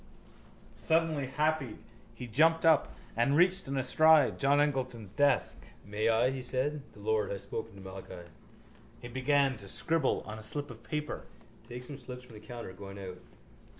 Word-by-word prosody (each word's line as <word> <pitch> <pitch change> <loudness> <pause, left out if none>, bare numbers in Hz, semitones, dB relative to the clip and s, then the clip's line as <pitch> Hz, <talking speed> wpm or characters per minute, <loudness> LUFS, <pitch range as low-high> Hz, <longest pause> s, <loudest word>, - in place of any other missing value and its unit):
_ - - -25 0.7
Suddenly 160 -4 +1
happied 150 -3 0 0.4
he 125 - -6
jumped 165 +8 +3
up 160 -3 +5 0.2
and 120 +5 +3
reached 185 +2 +3
in 135 0 -2
a 130 - +1
stride 155 +1 +5
John 140 +1 +4
Eglinton's 130 -8 -1
desk. 145 +4 +2 0.2
—May 105 +2 0
I? 115 +3 +3
he 135 -1 -4
said. 135 +4 -1
The - - -15
Lord 110 0 0
has 100 -1 -4
spoken 100 0 -6
to 100 - -11
Malachi. 95 -2 -9 0.7
He 120 - -8
began 135 +1 +2
to 100 -2 -9
scribble 165 +8 +1
on 110 +1 -7
a - - -9
slip 145 +6 -4
of 115 -1 -12
paper. 150 +4 -4 0.4
Take 125 +1 -7
some 140 +2 -8
slips 125 0 -8
from 125 -2 -15
the 105 - -10
counter 120 -6 -7
going 100 +1 -9
out. 95 -2 -7
130 Hz, 180 wpm, -31 LUFS, 110-145 Hz, 0.7 s, up